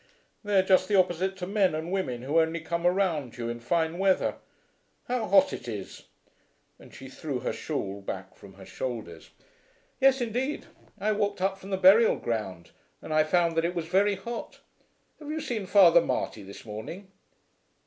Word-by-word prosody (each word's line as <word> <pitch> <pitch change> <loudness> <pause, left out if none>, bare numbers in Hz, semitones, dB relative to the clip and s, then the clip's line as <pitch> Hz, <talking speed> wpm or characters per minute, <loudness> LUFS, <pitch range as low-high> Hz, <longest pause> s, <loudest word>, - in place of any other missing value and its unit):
"They 205 -1 +1
are 190 - +5
just 185 -1 +3
the 210 - +1
opposite 185 +1 +1
to 180 - -4
men 190 -3 +1
and 160 +3 -4
women 130 -11 -2
who 145 +5 +2
only 160 +1 +1
come 170 +2 -1
around 175 -10 0
you 115 -1 -3
in 120 0 -5
fine 160 +7 -1
weather. 190 -1 +2 0.7
How 245 -3 -1
hot 195 0 +4
it 120 - -7
is!" 105 -5 -7 0.7
and - - -15
she 135 - -11
threw 135 -1 -5
her - - -2
shawl 100 -10 -4
back 95 -1 -7
from 100 -1 -15
her 95 0 -13
shoulders. 110 -12 -6 0.7
"Yes, 270 0 +4
indeed. 250 +5 -2 0.3
I 215 - +1
walked 205 -2 -1
up 195 +1 -1
from 195 - -11
the 190 - -1
burial 195 +5 +6
ground 95 -8 -4 0.3
and 155 - -6
I 155 0 +4
found 170 +1 +1
that 165 - +3
it 175 +1 -1
was 170 -2 -2
very 195 +4 +2
hot. 235 +5 -7 0.6
Have 300 -1 -9
you 315 +1 -2
seen 220 -9 -4
Father 180 -4 +7
Marty 110 - -2
this 100 +3 -11
morning?" 140 - -8
175 Hz, 180 wpm, -27 LUFS, 125-195 Hz, 0.7 s, Father